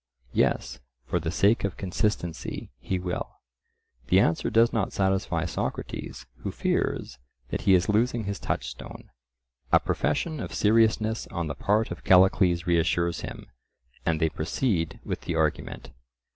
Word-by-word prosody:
"Yes, 60 0 +1 0.3
for 90 - 0
the 80 0 -3
sake 100 +6 +3
of 100 -2 -2
consistency, 95 -3 -2
he 95 - -2
will." 90 -1 -4 0.7
The 95 - +5
answer 80 -4 +2
does 115 +1 +4
not 105 -4 0
satisfy 95 -3 0
Socrates, 85 - -4
who - - -5
fears 65 - -1 0.3
that - - -2
he 95 - +5
is 90 0 +2
losing 115 +2 +2
his 100 -1 -4
touchstone. - - -5 0.6
A - - +7
profession 155 - -1
of - - -5
seriousness 110 0 +2
on 85 -2 -3
the 75 - -3
part 105 +8 +1
of 85 - -7
Callicles 90 -2 +4
reassures 85 0 +1
him, - - -7 0.6
and 80 -1 +1
they 80 0 +2
proceed 80 - -1
with - - -3
the - - -3
argument. - - -1
95 Hz, 145 wpm, -27 LUFS, 85-105 Hz, 0.7 s, A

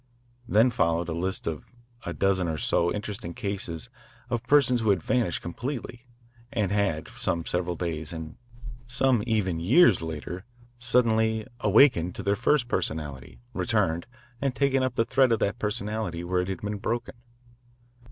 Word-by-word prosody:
Then 115 +4 +4
followed 85 -7 +1
a - - -2
list 95 +3 -2
of 80 -2 -5 0.4
a - - -1
dozen 95 -1 +1
or 80 -1 -2
so 85 +3 +1
interesting 100 -5 -5
cases 95 -5 -4 0.4
of 120 -2 0
persons 130 -4 +4
who 110 - +1
had 95 -5 +2
vanished 120 -8 0
completely 120 +5 -5 0.4
and 105 -8 0
had, 100 -7 0
some 85 -1 -2
several 90 0 -1
days 80 -3 -3
and 80 -1 -7 0.5
some 120 -1 +2
even 95 -7 0
years 110 - +5
later, 80 +3 -5 0.4
suddenly 110 -2 +2
"awakened" 105 - +4
to - - -6
their 100 0 +2
first 125 +4 +2
personality, 70 - -4
returned, 80 +4 0 0.3
and 135 -2 0
taken 135 -1 +2
up 130 -1 -1
the 115 - +2
thread 130 0 +3
of 115 - +4
that 100 +2 -1
personality 105 -5 -2
where 90 +1 0
it 90 - -4
had 95 - -4
been 105 0 -3
broken. 120 +3 -2
100 Hz, 155 wpm, -27 LUFS, 85-120 Hz, 0.5 s, years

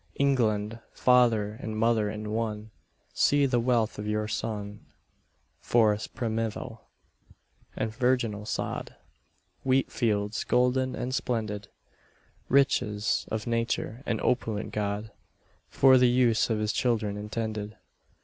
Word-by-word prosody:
England, 115 -5 +1
father 115 -4 +3
and 110 -1 -4
mother 110 -1 +2
in 105 0 -5
one, 110 -1 -3 0.4
See 145 0 +3
the 125 -3 +2
wealth 115 -3 +1
of 105 - -4
your 105 0 -1
son. 105 -2 -5 0.7
Forests 110 -3 +2
primeval, 115 -1 -4 0.9
and 110 0 -2
virginal 120 -5 0
sod, - - -4 0.7
Wheat 130 0 +2
fields 105 -3 0
golden 130 +1 +1
and 125 +1 -3
splendid: 110 -6 -2 0.8
Riches 110 -6 +2
of 110 -1 -3
nature 115 0 -2
and 110 - 0
opulent 110 -4 -1
God 105 +1 -3 0.6
For 130 -1 +6
the 125 -1 +5
use 120 -2 +3
of 110 - +1
his 105 0 -1
children 115 -6 0
intended. 105 0 -4
110 Hz, 115 wpm, -28 LUFS, 105-125 Hz, 0.9 s, For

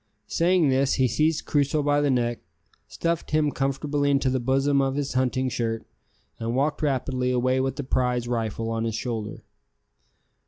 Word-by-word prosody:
Saying 170 -2 +2
this 135 +1 +2
he 130 -1 +3
seized 155 +6 +1
Crusoe 145 0 +1
by 145 0 +2
the 145 - +2
neck, 120 -2 0 0.5
stuffed 170 -1 -2
him 155 -1 +2
comfortably 145 +2 -1
into 140 -2 +2
the 130 - 0
bosom 135 +3 +2
of 135 0 0
his 145 -1 -2
hunting 130 0 +1
shirt, 115 -2 -2 0.5
and 115 +1 -2
walked 145 +3 0
rapidly 130 -3 0
away 130 +1 +1
with 135 0 -1
the 145 - -4
prize 125 -2 0
rifle 115 -1 -2
on 115 0 -1
his 115 -2 -2
shoulder. 110 -3 -4
130 Hz, 165 wpm, -25 LUFS, 125-145 Hz, 0.5 s, he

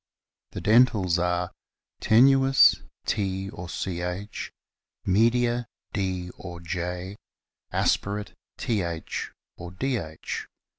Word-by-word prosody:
The - - -5
dentals 105 -6 +4
are: 90 0 0 0.5
Tenuis, 135 +3 +6 0.2
T 95 -1 -1
or 90 -3 -7
Ch; 90 +3 -4 0.5
Media, 120 +4 +3 0.3
D 95 -3 -2
or 85 -2 -7
/; 90 +3 -7
Aspirate, 105 +1 0 0.2
Th 85 -8 -2 0.3
or 85 - -7
Dh. 95 - -3
95 Hz, 85 wpm, -26 LUFS, 90-110 Hz, 0.5 s, Tenuis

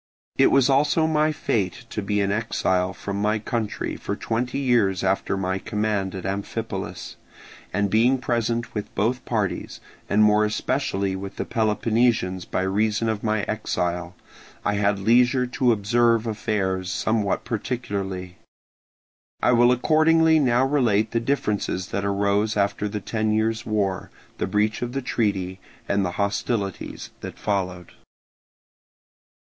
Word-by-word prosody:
It - - +5
was 135 -2 +4
also 145 +3 +3
my 155 -1 +2
fate 100 - -2
to 105 - -2
be 105 0 0
an 100 0 +1
exile 95 -4 0
from 100 +1 -5
my 105 +1 +2
country 110 0 -3
for - - -4
twenty 125 +3 -2
years 120 -9 +2
after 95 +1 0
my 95 0 -1
command 105 -2 -1
at 95 - -6
Amphipolis; 100 +1 -4 0.5
and 100 +2 +1
being 115 +6 +3
present 120 -1 -1
with 105 -2 -5
both 120 +5 0
parties, 105 -5 -2 0.3
and 105 +1 +4
more 105 0 +5
especially 105 -3 -1
with 95 +1 -6
the - - -3
Peloponnesians 110 -3 +1
by 95 - -1
reason 105 +3 +1
of 110 -2 -2
my 110 -2 0
exile, 90 -4 -2 0.5
I 105 - +2
had 100 0 +1
leisure 125 +5 +3
to 125 0 +1
observe 115 +2 +2
affairs 100 -4 -1
somewhat 110 -3 0
particularly. 100 -6 -4 1.1
I - - +5
will 120 0 +5
accordingly 160 +4 +4
now 125 -2 +3
relate 115 -7 +2
the 115 - +1
differences 105 -7 -1
that 100 - -2
arose 100 +2 +1
after 100 +1 0
the 105 0 -4
ten 110 +1 -1
years' 110 +1 0
war, 100 -4 -1 0.3
the - - 0
breach 105 +3 0
of 120 0 -3
the 135 -1 -2
treaty, 95 -6 -1 0.3
and 100 0 +1
the 90 -1 -2
hostilities 100 -1 -2
that - - -8
followed. 90 -4 -2
105 Hz, 140 wpm, -24 LUFS, 100-120 Hz, 1.1 s, It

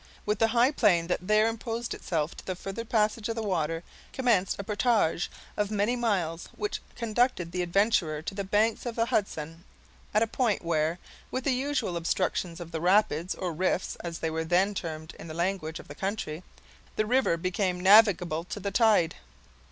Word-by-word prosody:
With 210 0 0
the 225 - +5
high 240 +4 +3
plain 190 - +3
that 180 +1 -2
there 215 +1 +4
interposed 230 +1 -3
itself 160 -2 -2
to - - -10
the 185 - -3
further 195 +5 -5
passage 220 -1 0
of 225 - -1
the 225 - -3
water, 165 -4 -1 0.3
commenced 230 -8 +2
a 200 - -4
portage 210 -5 +1 0.3
of 210 - 0
as - - -11
many 210 +3 +1
miles, 185 -9 -1
which 415 0 -3
conducted 230 -6 0
the 180 +1 -1
adventurer 175 -4 +1
to 180 - -4
the 200 0 -3
banks 210 +5 +1
of 235 - -4
the 230 - +2
Hudson, 165 -7 -2 0.5
at 215 +2 +3
a - - +3
point 225 -4 0
where, 160 0 +1 0.3
with 255 - -3
the 275 - +2
usual 255 -7 -1
obstructions 170 0 -1
of 170 -1 -8
the 160 -2 -3
rapids, 180 -2 +2
or 180 -3 -3
rifts, 185 +2 0
as 170 -1 -5
they 160 - -2
were 160 0 -1
then 180 +5 +2
termed 160 -4 -5
in - - -8
the 155 - -7
language 170 -2 -1
of - - -12
the 145 - -8
country, 190 -3 -3 0.5
the 215 - +1
river 245 -6 +2
became 185 +1 -1
navigable 185 -4 +5
to 205 - -6
the 200 +1 -3
tide. 210 -6 +4
195 Hz, 190 wpm, -28 LUFS, 170-220 Hz, 0.5 s, the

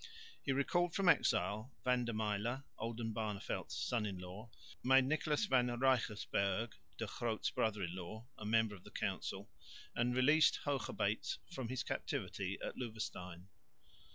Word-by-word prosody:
He 140 - 0
recalled 170 +5 +2
from 195 -2 +2
exile 110 -5 +3
Van 125 -1 +3
der 115 - -2
Myle, 110 +4 -1 0.2
Oldenbarneveldt's 110 -3 -3
son 120 -3 0
in 95 -2 -4
law; 90 +5 -8 0.3
made 130 +1 +6
Nicholas 150 +4 +1
van 125 -9 +4
Reigersberg, 115 -4 +1 0.2
De - - -2
Groot's 115 -3 -1
brother 105 -3 0
in 85 0 -3
law, 100 +5 -7
a - - -9
member 110 0 +3
of 95 - -11
the - - -11
council; - - -3 0.4
and 125 +1 +2
released 150 +5 +5
Hoogerbeets 115 -6 0
from 130 -9 -4
his 130 0 -1
captivity - - -2
at - - -4
Loevestein. 90 -7 -5
115 Hz, 140 wpm, -37 LUFS, 105-130 Hz, 0.4 s, made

